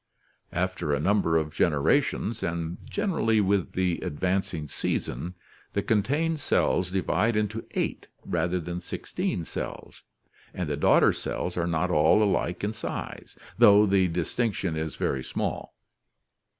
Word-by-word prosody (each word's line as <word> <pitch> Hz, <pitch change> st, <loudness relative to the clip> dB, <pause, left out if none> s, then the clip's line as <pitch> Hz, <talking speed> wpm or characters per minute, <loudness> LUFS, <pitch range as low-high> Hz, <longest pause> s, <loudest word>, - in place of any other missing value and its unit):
After 90 Hz, -4 st, -1 dB
a -, -, -2 dB
number 85 Hz, -1 st, +2 dB
of 75 Hz, -1 st, -2 dB
generations, 75 Hz, -3 st, +1 dB
and 85 Hz, 0 st, -3 dB
generally 165 Hz, -, +1 dB
with 100 Hz, -2 st, +1 dB
the 90 Hz, -2 st, 0 dB
advancing 90 Hz, -1 st, -2 dB
season, 80 Hz, +5 st, -3 dB, 0.4 s
the -, -, 0 dB
contained 145 Hz, +10 st, +1 dB
cells 90 Hz, -8 st, +1 dB
divide 95 Hz, +4 st, +1 dB
into 105 Hz, +1 st, -2 dB
eight -, -, -2 dB, 0.2 s
rather 90 Hz, +1 st, 0 dB
than 85 Hz, +1 st, -5 dB
sixteen 85 Hz, -1 st, -3 dB
cells, -, -, -6 dB, 0.5 s
and 90 Hz, -3 st, -2 dB
the 75 Hz, -, -1 dB
daughter 75 Hz, -, +4 dB
cells 90 Hz, -, -3 dB
are 85 Hz, -1 st, 0 dB
not 85 Hz, +1 st, 0 dB
all 80 Hz, +7 st, +5 dB
alike 95 Hz, -3 st, 0 dB
in 105 Hz, +2 st, -1 dB
size, 110 Hz, -, -6 dB, 0.2 s
though 105 Hz, +1 st, +8 dB
the 95 Hz, -2 st, +3 dB
dis 85 Hz, -1 st, -2 dB
tinction 100 Hz, -8 st, 0 dB
is 80 Hz, -2 st, -3 dB
very 65 Hz, -1 st, -1 dB
small. -, -, -4 dB
90 Hz, 135 wpm, -27 LUFS, 80-105 Hz, 0.5 s, though